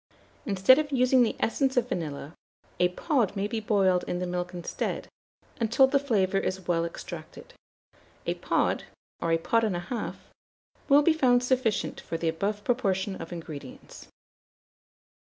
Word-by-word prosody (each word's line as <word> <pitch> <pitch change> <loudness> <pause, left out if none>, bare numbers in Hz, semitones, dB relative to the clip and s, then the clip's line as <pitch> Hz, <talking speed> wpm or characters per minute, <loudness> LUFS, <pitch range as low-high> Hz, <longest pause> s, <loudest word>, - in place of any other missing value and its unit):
Instead 200 +7 +5
of 295 -1 -2
using 255 -1 +4
the 235 - +2
essence 265 +3 0
of 245 -1 +3
vanilla, 155 - -4 0.5
a 180 - +4
pod 230 - 0
may 195 0 -1
be 225 +1 -2
boiled 195 -4 +2
in 175 - -2
the 180 - -2
milk 180 0 -3
instead, 175 -2 -4 0.5
until 235 +3 +4
the 275 +1 +2
flavour 200 -8 +1
is 190 -2 -3
well 170 -1 +1
extracted. 170 - -9 0.7
A - - 0
pod, - - 0 0.4
or 165 - 0
a 165 - +4
pod 230 +7 +1
and 210 -5 0
a - - -1
half, 225 +7 -4 0.7
will 285 +1 +7
be 330 - +5
found 250 -5 +3
sufficient 250 -4 0
for 165 - -4
the 165 0 0
above 205 +5 -2
proportion 200 -6 0
of 165 - -8
ingredients. 155 -6 -9
205 Hz, 155 wpm, -27 LUFS, 180-250 Hz, 0.7 s, will